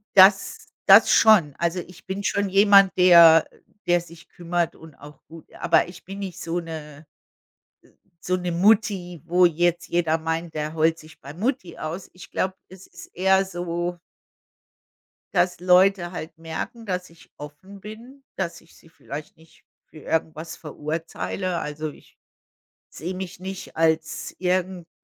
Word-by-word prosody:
Das 195 - +5 0.2
das - - +7
schon. 195 -10 +5
Also, 170 +1 -1
ich 180 0 -12
bin 195 +2 -5
schon 200 0 0
jemand, 195 0 +6
der 170 -3 +7 0.4
der 175 0 +3
sich 170 -1 -15
kümmert 175 -1 -2
und 160 -3 -15
auch 150 +1 -15
gut, 165 0 -14
aber 165 0 +2
ich 180 +1 -13
bin 195 +1 -8
nicht 190 -4 -7
so 170 +1 -2
'ne 155 -2 -9 1.2
so 185 - +1
'ne 180 -1 -3
Mutti, 185 -3 +1
wo 180 +1 +4
jetzt 175 +1 +1
jeder 165 -2 +1
meint, 165 +1 -4
der 155 0 -4
heult 165 +1 +2
sich 155 +1 -16
bei 140 +2 -10
Mutti 220 - -3
aus. 165 +4 -6
Ich 180 +2 -14
glaube, 185 0 -1
es 190 0 -15
ist - - -13
eher 190 +1 +3
so 175 -1 -4 1.4
Das 175 0 +1
Leute 180 0 +3
halt 160 -2 -8
merken, 165 +8 -7
dass 180 -2 -4
ich 165 - -20
offen 170 +7 -12
bin, 235 +7 -12
dass 180 -3 -4
ich 165 - -23
sie 165 - -20
vielleicht 150 -1 -9
nicht 160 0 -23 0.2
für 155 - -14
irgendwas 160 +1 -3
verurteile. 165 +3 -4
Also, 150 +1 -5
ich - - -20 0.7
sehe 170 +6 -6
mich 185 -1 -7
nicht 190 +1 -8
als 160 0 0
irgendwas 180 -1 -1
175 Hz, 150 wpm, -23 LUFS, 160-190 Hz, 1.4 s, das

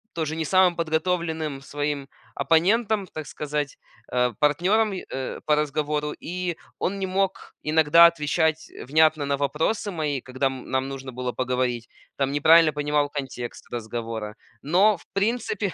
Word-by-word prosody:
тоже 160 -1 -2
не 160 - -2
самым 185 +1 +4
подготовленным 160 -2 -1
своим 145 0 -3 0.3
оппонентом, 195 - +2
так 155 -2 -7
сказать, 150 -1 -3 0.3
а, 125 -1 +1
партнером 190 +9 +2
и 185 - -6
э, 130 0 -4
по 150 - +4
разговору. 150 0 -1
И 180 -1 -4 0.2
он 195 +2 -1
не 190 - -2
мог 190 0 -2
иногда 160 +2 +6
отвечать, 160 -1 +1
э, - - -10
внятно 155 +2 +3
на 140 0 0
вопросы 160 +9 -1
мои, 150 -6 -2
когда, 130 +2 -1
м, 130 -1 -6
нам 130 0 0
нужно 135 -1 -7
было 125 0 -3
поговорить. 125 -1 -1 0.3
Там 135 -1 0
неправильно 160 +2 +6
понимал 145 0 0
контекст 130 -4 -6
разговора. 115 -2 -5 0.3
Но 190 +7 +4
в - - -20
принципе 205 -2 -1
150 Hz, 150 wpm, -25 LUFS, 135-170 Hz, 0.3 s, иногда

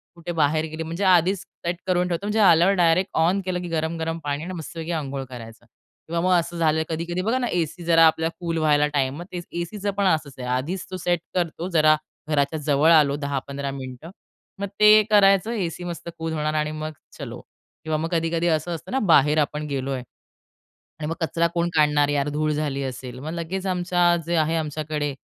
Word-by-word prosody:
कुठे 170 0 -6
बाहेर 155 +1 +2
गेली 160 +1 -5
म्हणजे, 165 +5 -4
आधीच 185 +1 +4
सेट 170 0 -5
करून 180 0 +2
ठेवतो 175 +3 -3
म्हणजे 215 +1 0
आल्यावर 180 0 +6
डायरेक्ट 180 +1 +3
ऑन 180 +5 +3
केलं, 180 -1 -1
की 175 - -5
गरम-गरम 165 0 -2
पाणी 145 +1 -2
आणि 185 +2 -5
मस्त 165 0 -8
अंघोळ 150 -5 -3
करायचा 115 -2 -10 0.4
किंवा 170 +1 -1
मग 185 +1 +1
असं 170 +1 -5
झालेलं 160 -1 +2
कधी-कधी 170 +2 -2
बघा 225 +6 0
ना 245 - -1
एसी 175 -2 -2
जरा 165 -1 +6
आपल्या 160 +1 +1
कूल 170 -2 -2
व्हायला 150 -2 +3
टाईम 135 -2 0
मग 175 - -7
ते 180 - -5 0.2
एसीच 200 +4 -6
पण 200 - +2
असंच 155 -6 +1
आहे. 125 - -5
आधीच 140 +10 -2
तो 185 - -4
सेट 175 -1 0 0.2
करतो, 175 0 -1
जरा 155 -2 +5 0.3
घराच्या 150 +1 +1
जवळ 150 +2 +3
आलो 150 -3 +5
10-15 140 -1 -4
मिनिटं. 135 +4 -8 0.5
मग 200 - -2
ते 210 0 +8
करायचं 195 0 +5
एसी 180 -6 -3
मस्त 170 -1 -6
कूल 160 0 -3
होणार 155 -1 -1
आणि 150 0 0
मग 155 0 -5 0.3
चलो - - -7 0.4
किंवा 155 -1 -1
मग 165 +2 -2
कधी-कधी 165 0 0
असं 160 +1 0
असतं 165 - -10
ना 265 - +1
बाहेर 150 +1 +5
आपण 150 0 -1
गेलोय. 135 -2 -2 1.0
आणि 150 - -4
मग 165 - -2
कचरा 165 +1 +1
कोण 170 0 +1
काढणार 150 -1 +4
यार 145 0 0
धूळ 155 +1 -1
झाली 145 -2 -2
असेल 130 -1 -6
मग 150 +4 -6
लगेच 185 +3 -4
आमच्या 175 -1 +2
जे 170 0 0
आहे 160 +1 +2
आमच्याकडे 150 -2 -3
160 Hz, 195 wpm, -23 LUFS, 150-175 Hz, 1.0 s, ते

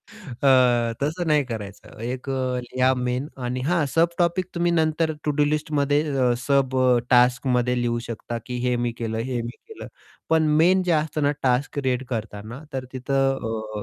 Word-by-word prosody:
अ, 130 - +2
तसं 155 +5 -1
नाही 150 -2 +3
करायचं 105 -6 -8
एक 125 +3 -4
अ, 130 -1 -1
लिहा 130 +1 +1
मेन 125 +2 -2 0.2
आणि 125 +1 -2
हां, 165 +3 +1
सब 165 +5 +2
टॉपिक 175 +1 +1
तुम्ही 170 0 +1
नंतर 160 -1 +1
टू-डू-लिस्टमध्ये 150 -1 +1 0.2
अ, 125 -2 +3
सब 135 +1 +1 0.4
टास्कमध्ये 125 0 +3
लिहू 120 -1 0
शकता, 115 +1 -5
की 125 -1 -4
हे 125 0 +2
मी 120 0 -1
केलं, 110 -1 -3
हे 120 +1 -2
मी 115 - -5 0.2
केलं. 445 - -9 0.4
पण 160 -1 +4
मेन 185 +4 +4
जे 180 - 0
असतं 155 -1 0
ना, 145 - +3
टास्क 130 +3 +1
रीड 130 -1 0
करतांना, 110 +2 -6
तर 130 -1 -3
तिथं 125 -5 -1
130 Hz, 160 wpm, -24 LUFS, 120-150 Hz, 0.4 s, पण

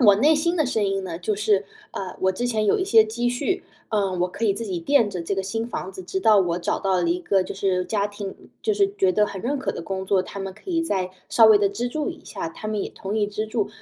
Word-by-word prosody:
我 205 - +9
内 295 +9 +5
心 340 +4 +1
的 310 - +3
声 225 -4 0
音 195 -1 0
呢， 165 -2 -5
就 205 +4 -1
是， 205 -1 +1 0.2
呃， 185 -2 -6
我 190 0 +2
之 240 +6 -2
前 220 -3 0
有 205 - +3
一 375 - 0
些 225 - +6
积 235 +3 -1
蓄， 365 +10 -1 0.3
呃， 205 -3 +1
我 180 - +3
可 200 +5 -2
以 200 - +3
自 230 - -4
己 185 -4 -3
垫 230 +4 +3
着 180 -3 -4
这 195 +4 -2
个 195 - -1
新 225 +4 -3
房 190 -5 -5
子， 185 - -8
直 185 +1 -3
到 215 +1 +5
我 175 -3 +1
找 170 - -1
到 195 -1 0
了 175 -2 +1
一 180 +1 0
个 190 +1 +2
就 185 - -6
是 185 -2 0
家 205 0 0
庭 205 -1 -7 0.3
就 435 - +1
是 400 -1 +2
觉 185 -1 +3
得 210 +1 +3
很 195 - -6
认 275 +4 -1
可 265 - -1
的 - - -6
工 190 +2 -4
作， 190 -1 +3
他 200 +1 -8
们 195 0 -4
可 365 - -9
以 330 - +1
再 190 - -1 0.2
稍 230 - +6
微 220 -1 +8
地 200 -1 +3
资助 245 +9 -2
一 - - -8
下。 165 - -5
他 165 - -8
们 215 -1 -1
也 - - -4
同 195 +3 -5
意 210 -1 +2
资助， 215 +1 -2
205 Hz, 315 characters per minute, -24 LUFS, 190-230 Hz, 0.3 s, 我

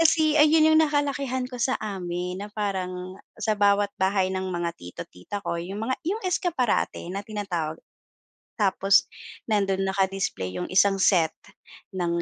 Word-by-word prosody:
Kasi 315 -2 +4
ayun 310 +1 +6
'yung 315 - +6
nakalakihan 280 -4 0
ko 250 - -7
sa 260 +3 +2
amin 180 -2 -4
na 210 - -8
parang 185 -3 -3 0.2
sa 215 0 0
bawat 205 0 +3
bahay 190 0 +2
ng 190 0 -2
mga 175 -1 -1
tito, 85 0 -8
tita 90 - -7
ko 170 - -2
'yung 190 +4 -5
mga 260 +3 0
'yung 420 +5 -1
escaparate 335 - 0
na 200 +1 -3
tinatawag, 175 -7 -3 0.8
tapos 195 0 +4 0.4
nando'n 195 -2 +1
naka-display 190 - -1
'yung 180 - -4
isang 195 +1 +4
set 175 -5 +4 0.6
ng 170 -1 0
195 Hz, 145 wpm, -25 LUFS, 180-250 Hz, 0.8 s, ayun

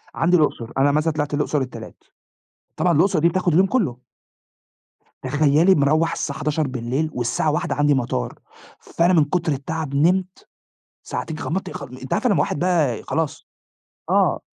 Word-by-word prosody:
عندي 175 +2 +3
الأقصر، 120 -7 -1
أنا 140 +1 +4
مثلًا 155 +2 +1
طلعت 150 -1 -3
الأقصر 150 0 0
التلات، 130 -1 -8 0.7
طبعًا - - +2
الأقصر 180 +3 +3
دي 170 +2 +4
بتاخد 180 -1 0
اليوم 185 +4 +4
كلّه. 185 - -1 1.3
تخيلّي 155 +5 +3
مروّح 155 +3 +2
الساعة 140 - -4
23:00 140 -1 -1
والساعة 120 +5 0
01:00 150 - -1
عندي 145 0 +3
مطار، 120 - -2 0.4
فأنا 175 +2 +1
من 160 -3 +5
كُتر 170 0 -1
التَعب 140 +1 -4
نمت 185 +5 +1 0.6
ساعتين، 160 -1 -5
غمضت 190 +4 -4
غلم 125 +1 -9
أنتِ 130 0 -9
عارفة 250 - +1
لمّا 165 -7 +2
واحد 145 - -1
بقى 165 -9 +1
ي - - -13
خلاص، 160 -2 -3 0.6
آه - - +2
155 Hz, 155 wpm, -21 LUFS, 140-170 Hz, 1.3 s, من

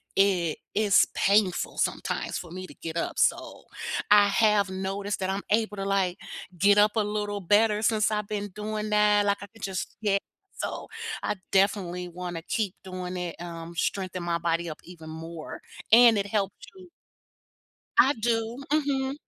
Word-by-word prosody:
it 185 -5 +2
is 205 -2 +5
painful 195 -2 +2
sometimes - - -1
for 175 - -8
me 185 +1 -7
to - - -12
get 165 -1 -7
up 170 - -2
so - - 0 0.4
I 205 0 +7
have 210 -1 +3
noticed 195 +2 -3
that 190 -1 -2
I'm 195 +1 -2
able 215 0 +1
to, 195 - -3
like, 195 -2 0 0.4
get 200 +3 +5
up 210 0 +6
a 220 - +3
little 205 -1 -3
better 210 +3 +3
since 215 0 +2
I've 210 -1 -1
been 205 -1 -3
doing 215 0 -3
that, 210 -1 +4
like, 200 0 +1
I 200 - -8
could 225 +2 -19
just 190 0 -4
yeah 200 -2 +2 0.4
so - - -4 0.3
I - - -1 0.2
definitely 190 -2 +1
wanna 175 -1 -6
keep 205 0 -2
doing 185 -1 -5
it, 175 -2 -4
um, 170 -1 -7
strengthen 185 +1 -2
my 170 -1 0
body 170 0 -1
up 155 - -7
even 165 -3 -11
more 160 0 -8 0.3
and 235 -1 +8
it 200 0 -1
helps 200 -1 -1 0.2
you 365 -1 -14 1.1
I 270 - +7
do, 230 +2 -1
mhm. 275 -3 +1
200 Hz, 170 wpm, -27 LUFS, 180-210 Hz, 1.1 s, and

